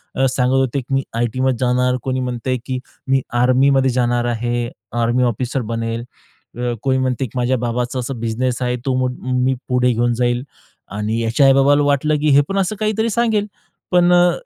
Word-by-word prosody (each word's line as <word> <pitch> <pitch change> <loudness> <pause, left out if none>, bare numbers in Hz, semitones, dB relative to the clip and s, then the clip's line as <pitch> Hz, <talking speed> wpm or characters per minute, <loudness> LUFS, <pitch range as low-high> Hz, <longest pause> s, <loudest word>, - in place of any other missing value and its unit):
अ, 135 - +2
सांगत 125 0 +1
होते, 135 0 +1
की 135 +2 -7
"मी 135 0 +1
आयटीमध्ये 125 +2 0
जाणार," 125 +1 +2
कोणी 130 -1 -1
म्हणतंय, 125 0 -2
की 130 -1 -3 0.3
"मी 135 0 +2 0.2
आर्मीमध्ये 130 +2 +3
जाणार 120 -1 +1
आहे, 120 0 -1 0.3
आर्मी 120 +2 +2
ऑफिसर 125 +3 -1
बनेल." 115 0 -3 0.5
अ, 120 0 -1
कोई 130 -1 +2
म्हणते, 130 0 -1
की 120 - -8
"माझ्या 125 +1 +1
बाबाचा 120 +2 -2
असा 130 +2 -3
बिझनेस 120 +3 -2
आहे. 125 0 0
तो 130 -1 +1
मो 130 0 +1 0.3
मी 130 +1 +1
पुढे 125 0 +2
घेऊन 120 +1 +1
जाईल." 120 +1 0 0.5
आणि 105 +2 -1
याच्या 115 +5 +2
आई-बाबाला 135 +2 +4
वाटलं, 145 +2 +2
की 155 - +2
हे - - +7
पण 195 - -1
असं 195 +3 0
काहीतरी 220 +1 0
सांगेल. 220 -2 +1 0.4
पण 175 0 +4
अ, 175 0 +5
125 Hz, 185 wpm, -19 LUFS, 120-135 Hz, 0.5 s, हे